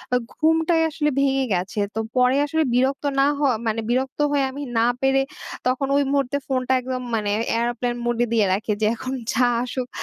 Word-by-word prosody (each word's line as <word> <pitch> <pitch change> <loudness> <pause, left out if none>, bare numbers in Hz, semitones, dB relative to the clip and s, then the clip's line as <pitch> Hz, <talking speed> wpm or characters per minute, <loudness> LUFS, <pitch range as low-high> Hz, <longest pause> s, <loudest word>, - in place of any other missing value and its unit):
আ - - +5 0.2
ঘুমটাই 325 +1 +2
আসলে 300 -1 0
ভেঙে 270 -1 +2
গেছে। 185 +3 -2 0.2
তো - - -1 0.2
পরে 250 +1 +4
আসলে 320 +2 +1
বিরক্ত 270 +3 +1
না 275 - +5
হয় 275 -5 +2
মানে 225 +1 0
বিরক্ত 260 +3 -1
হয়ে, 285 -1 +2
আমি 280 +2 -7 0.2
না 225 - +4 0.2
পেরে 270 0 +3 0.5
তখন 260 +2 0
ওই 285 - +3
মুহূর্তে 280 -1 +1
ফোনটা 260 -1 0
একদম 255 0 -4
মানে 210 -2 -1 0.2
এয়ারপ্লেন 240 +1 -1
মোডে 240 0 +1
দিয়ে 220 -3 +3
রাখি 210 +3 -1
যে, - - +3
এখন 255 +3 -5 0.2
যা 250 +2 +3 0.2
আসুক, 250 0 -4
260 Hz, 185 wpm, -22 LUFS, 240-280 Hz, 0.5 s, আ